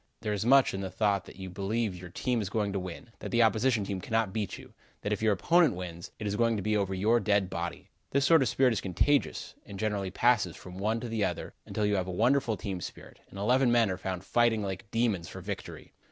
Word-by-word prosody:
There 105 -2 -1
is 105 +2 -2
much 135 +1 +6
in 95 - -3
the 95 - -3
thought 100 -3 0
that - - -12
you 95 0 -7
believe 100 +2 -1
your 90 0 -9
team 120 +6 -1
is 100 - -3
going 105 -2 -1
to 100 - -1
win; 90 +5 -8
that - - -6
the 120 - +3
opposing 115 0 +3
team 95 -1 -4
cannot 110 -2 0
beat 105 -4 -3
you; - - -14 0.3
that 105 - -1
if 105 - -3
your 110 -1 +3
opponent 150 - +3
wins, 85 -2 -7
it 110 - -6
is 100 0 -1
going 115 +1 +2
to 100 - -3
be 110 0 +1
over 100 -2 0
your 110 +5 +3
dead 100 -2 +1
body. 85 0 -5 0.2
This 140 0 +2
sort 165 -3 +6
of 130 - +2
spirit 130 -3 +3
is 105 - -2
contagious, 115 +10 0
and 100 - -9
generally 105 -2 -1
passes 110 -3 +2
from 90 +1 -10
one 110 +3 0
to 120 - -4
the 110 -2 -1
other, - - -3
until 105 - -1
you 105 -1 +2
have 95 -1 -1
a - - -3
wonderful 115 +3 +2
team 95 -4 -4
spirit, - - -9
and - - -11
eleven 125 +5 +3
men 115 -4 +4
are - - -1
found 95 -1 -4
fighting 115 0 +2
like 100 +2 -5
demons 110 -7 0
for - - -8
victory. - - -7
105 Hz, 250 wpm, -29 LUFS, 95-115 Hz, 0.3 s, much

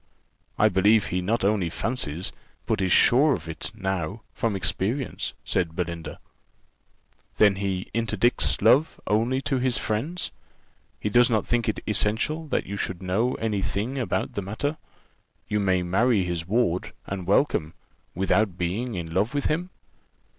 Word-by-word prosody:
"I - - +5
believe 105 +3 +4
he 90 +1 -1
not 105 +3 0
only 100 -4 +2
fancies, 90 - -3 0.3
but - - 0
is 95 -1 +1
sure 140 - +5
of 85 -2 -9
it 80 +2 -5
now, 95 0 -3
from 115 -3 -1
experience," 100 +7 -1
said 85 -3 -1
Belinda. 85 -3 -4 1.2
"Then 100 -2 +5
he 95 -1 -2
interdicts 115 +1 +1
love 150 +5 +4
only 115 +5 +1
to 135 -1 0
his 125 -1 +1
friends? 145 +12 -2 0.7
He 105 - -2
does 120 +2 +5
not 110 -3 +1
think 120 -1 +1
it 110 - -2
essential 110 +10 0
that - - -1
you 100 +1 -5
should 95 -1 -3
know 110 +7 +1
any 105 -3 -1
thing 115 +8 -2
about 115 -8 -1
the 100 - -2
matter. 125 +11 -3 0.7
You 105 - 0
may 95 -2 +2
marry 100 +4 +2
his 85 -2 -3
ward, 100 -4 0
and 95 -2 -5
welcome, 95 - +2 0.4
without 95 0 +1
being 105 +8 -2
in 85 -2 -5
love 105 +9 +1
with 145 - 0
him." 175 +4 0
105 Hz, 155 wpm, -25 LUFS, 90-120 Hz, 1.2 s, I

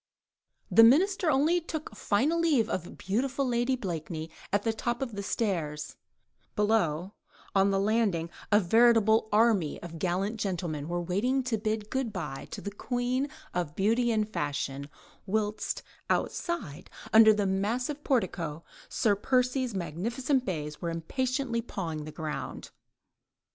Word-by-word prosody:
The 225 - +8
Minister 350 - +5
only 310 +5 +3
took 310 -8 -6
final 275 +13 +1
leave 295 -10 +3
of 175 -6 -4
beautiful 260 +8 -1
Lady 240 +2 +1
Blakeney 165 -6 -5 0.2
on 205 - +2
the 225 - +1
top 240 +2 -2
of 265 -3 -3
the 200 - -4
stairs; 160 -9 -2 0.6
below, 200 -4 +1 0.4
on 195 0 +4
the 195 0 +2
landing, 200 -6 +1 0.2
a 205 - +7
veritable 220 +2 +4
army 210 -8 +3
of 165 -1 -8
gallant 195 +5 -1
gentlemen 170 -7 -2
were 175 +1 -2
waiting 240 +10 +1
to 250 -2 0
bid 215 0 -2
"Good 260 -4 -1
bye" 150 -9 -5
to - - -7
the 205 - -5
queen 250 +5 -1 0.2
of 170 -4 -2
beauty 230 +4 +2
and 215 -2 +1
fashion, 140 -6 -3 0.4
whilst 210 +1 -1 0.3
outside, 215 - -2 0.2
under 220 0 +9
the 210 -1 +1
massive 235 +10 -1
portico, 170 - -1 0.3
Sir 210 -3 +2
Percy's 250 +2 +1
magnificent 235 - -1
bays 150 -6 -4
were 170 - -2
impatiently 245 - -1
pawing 165 -9 -5
the 155 - -7
ground. 150 -2 -5
210 Hz, 140 wpm, -29 LUFS, 175-245 Hz, 0.6 s, under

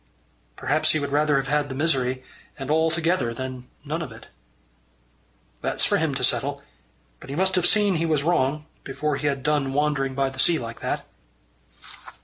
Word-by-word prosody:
"Perhaps 150 +4 +1
he 155 - +1
would 140 -1 -3
rather 150 0 +3
have 135 -1 +1
had 145 0 +1
the 130 - -5
misery 130 -4 +1 0.3
and 135 0 -4
all 160 +1 +3
together 165 -7 0
than 130 0 -6 0.2
none 155 +4 -2
of 150 -7 -5
it." 110 - -13 1.3
"That's - - +1
for - - +3
him - - 0
to - - -2
settle. - - 0 0.6
But - - -12
he 140 - -4
must 190 +3 +2
have 180 -2 +4
seen 205 -4 +4
he 165 - 0
was 155 -3 +2
wrong, 150 -2 +1 0.2
before 145 +1 -2
he 150 - -1
had 135 -2 -1
done 145 -3 +1
wandering 140 -2 0
by 135 0 +1
the 130 - -10
sea 165 +5 +4
like 115 -4 -6
that." - - -3
145 Hz, 185 wpm, -24 LUFS, 135-155 Hz, 1.3 s, have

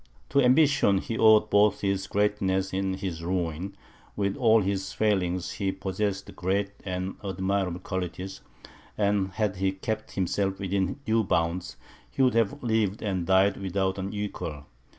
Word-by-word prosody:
To 140 - +3
ambition, 130 -6 +4
he 110 +4 -3
owed 110 -1 +5
both 105 +1 +4
his 100 -1 -1
greatness 95 -2 0
and 95 0 -1
his 95 -4 -5
ruin; 90 +1 -2 0.4
with 100 -1 0
all 115 -3 +4
his 95 0 -2
failings, 95 -4 0
he 100 -2 -1
possessed 95 +1 -3
great 100 +2 -1
and 95 0 -4
admirable 95 -1 -1
qualities, 95 +1 -5 0.6
and 100 -2 +2
had 105 -2 -1
he 95 0 +1
kept 100 +3 -4
himself 95 +1 0
within 95 -1 -1
due 110 0 +2
bounds, 85 0 -1 0.3
he 135 - 0
would 130 - +4
have 115 +5 +1
lived 110 -3 0
and 95 -5 -2
died 95 +1 +4
without 95 0 -1
an 95 +1 -3
equal. 85 -8 -5
95 Hz, 150 wpm, -27 LUFS, 95-105 Hz, 0.6 s, owed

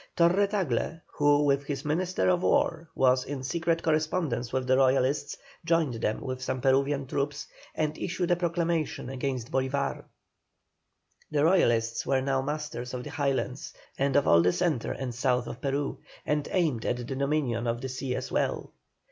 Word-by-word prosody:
Torre 180 +4 +4
Tagle, 165 - -1
who 145 0 +2
with 140 -1 +2
his 140 0 -4
Minister 175 +5 0
of 180 -1 +2
War, 165 -2 +1
was 130 -1 +3
in 135 -1 -5
secret 165 +4 0
correspondence 155 -6 0
with 130 -1 -1
the 130 0 +3
Royalists, 135 +2 +2 0.3
joined 165 -5 +2
them 105 - -1
with 130 -1 -4
some 130 0 -2
Peruvian 135 +1 +2
troops, 140 +2 -2 0.3
and 155 -1 -1
issued 180 0 -1
a - - +5
proclamation 170 -5 -1
against 130 -2 -3
Bolívar. 135 +1 -1 1.2
The 145 -1 +1
Royalists 115 -10 +3
were 135 - +3
now 135 0 0
masters 140 -4 -4
of 125 - -5
the - - -7
Highlands, 135 -2 -2 0.2
and 135 0 0
of 145 - +4
all 85 - +6
the 90 +1 +3
centre 165 -9 0
and 130 -3 -4
south 125 0 +1
of 120 - -8
Peru, 140 0 -2 0.3
and 150 -1 0
aimed 155 -11 +1
at 120 - 0
the 125 - -5
dominion 135 -2 -1
of 115 0 -1
the 130 +1 -5
sea 130 0 -3
as - - -5
well. - - -1
140 Hz, 170 wpm, -28 LUFS, 130-155 Hz, 1.2 s, all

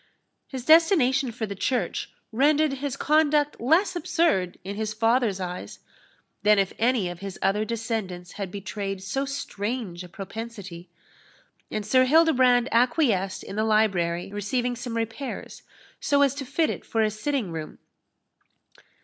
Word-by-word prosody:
His 260 -3 -7
destination 310 -6 +5
for 225 0 -4
the 200 - -5
church 250 +6 -1 0.2
rendered 290 +4 +3
his 275 0 -4
conduct 300 -2 +2
less 330 - +3
absurd 320 - +1
in 200 +2 -5
his 215 0 -3
father's 225 -3 +2
eyes, 180 -1 -6 0.6
than 210 0 +5
if 195 -1 +1
any 230 -4 +2
of 175 -1 -6
his 195 -1 -7
other 195 +2 +2
descendants 215 -6 -4
had 200 -2 -5
betrayed 195 0 -5
so 270 +7 -2
strange 225 -8 -4
a 180 - -11
propensity, 195 -2 -8 0.8
and 215 -1 -3
Sir 255 +4 +4
Hildebrand 255 -5 +4
acquiesced 230 - +2
in 200 - -8
the 215 - +2
library 195 -5 +1
receiving 245 +4 -1
some 240 -1 -5
repairs, 225 +4 -5 0.4
so 285 0 +3
as 275 -2 +3
to 280 -1 -6
fit 315 +5 +1
it - - -6
for 225 -1 0
a 215 - +1
sitting 220 -2 -2
room. 160 -2 -6
225 Hz, 145 wpm, -25 LUFS, 195-270 Hz, 0.8 s, destination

